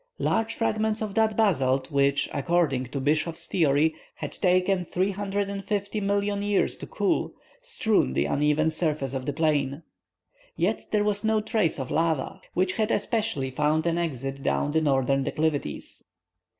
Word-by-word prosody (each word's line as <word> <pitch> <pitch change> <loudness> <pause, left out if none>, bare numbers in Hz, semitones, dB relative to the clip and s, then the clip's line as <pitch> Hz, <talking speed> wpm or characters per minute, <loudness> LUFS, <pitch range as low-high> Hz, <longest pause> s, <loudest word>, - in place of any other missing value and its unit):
Large 225 0 0
fragments 220 -1 0
of 210 -2 -4
that 220 0 +2
basalt 135 -10 +2
which, 140 0 +2
according 140 -3 +1
to 140 +3 -4
Bischof's 155 +4 0
theory, 155 -2 +2 0.2
has - - -6
taken 185 0 +2
350,000,000 200 +1 -1
years 205 -1 +1
to - - -8
cool, - - -1 0.3
strewed 220 - +1
the 70 - +2
uneven 150 - +2
surface 155 -5 -1
of 130 -1 -4
the 145 - 0
plain. 150 -1 0 0.7
Yet - - -1
there 210 -1 +2
was 210 0 0
no 220 0 +2
trace 215 -8 0
of 130 - -4
lava, 160 -3 0
which 185 +1 +1
had 215 0 +1
especially 215 - -1
found 150 +4 +1
an 170 0 +1
exit 135 -4 -3
down 145 - 0
the 160 +1 +2
northern 135 -2 +2
declivities. 150 - -2
165 Hz, 145 wpm, -26 LUFS, 140-205 Hz, 0.7 s, that